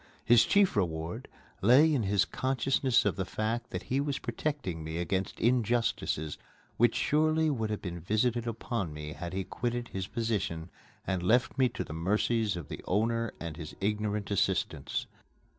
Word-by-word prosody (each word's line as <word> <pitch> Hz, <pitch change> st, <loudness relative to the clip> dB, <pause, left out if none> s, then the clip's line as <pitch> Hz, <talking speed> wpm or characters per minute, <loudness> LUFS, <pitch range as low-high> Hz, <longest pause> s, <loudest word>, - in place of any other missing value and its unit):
His 115 Hz, 0 st, +6 dB
chief 200 Hz, -2 st, +4 dB
reward 85 Hz, -4 st, -2 dB, 0.3 s
lay 135 Hz, -, +6 dB
in 135 Hz, -, +2 dB
his 100 Hz, -2 st, +2 dB
consciousness 130 Hz, -1 st, +1 dB
of -, -, +1 dB
the 95 Hz, -, 0 dB
fact 115 Hz, +5 st, -2 dB
that -, -, -4 dB
he 130 Hz, -, 0 dB
was 140 Hz, -1 st, -1 dB
protecting 120 Hz, -, -3 dB
me 80 Hz, +1 st, -4 dB
against 95 Hz, +2 st, -2 dB
injustices 115 Hz, -10 st, +1 dB, 0.4 s
which 120 Hz, 0 st, +4 dB
surely 155 Hz, +1 st, +2 dB
would 110 Hz, -6 st, -1 dB
have 105 Hz, -, -3 dB
been 85 Hz, -2 st, -4 dB
visited 115 Hz, +6 st, 0 dB
upon 115 Hz, -, -3 dB
me 75 Hz, 0 st, -6 dB
had 85 Hz, -1 st, -6 dB
he 95 Hz, 0 st, -1 dB
quitted 120 Hz, +4 st, -3 dB
his 95 Hz, -1 st, -4 dB
position 100 Hz, -8 st, -2 dB, 0.3 s
and 95 Hz, -2 st, -1 dB
left 120 Hz, +7 st, +2 dB
me 130 Hz, -2 st, +3 dB
to -, -, -4 dB
the -, -, -8 dB
mercies 105 Hz, +5 st, +1 dB
of 85 Hz, -4 st, -6 dB
the -, -, -7 dB
owner 115 Hz, +4 st, +1 dB
and 80 Hz, -2 st, -6 dB
his 80 Hz, -3 st, -7 dB
ignorant 105 Hz, 0 st, -1 dB
assistants. 100 Hz, -, 0 dB
110 Hz, 165 wpm, -30 LUFS, 90-120 Hz, 0.4 s, His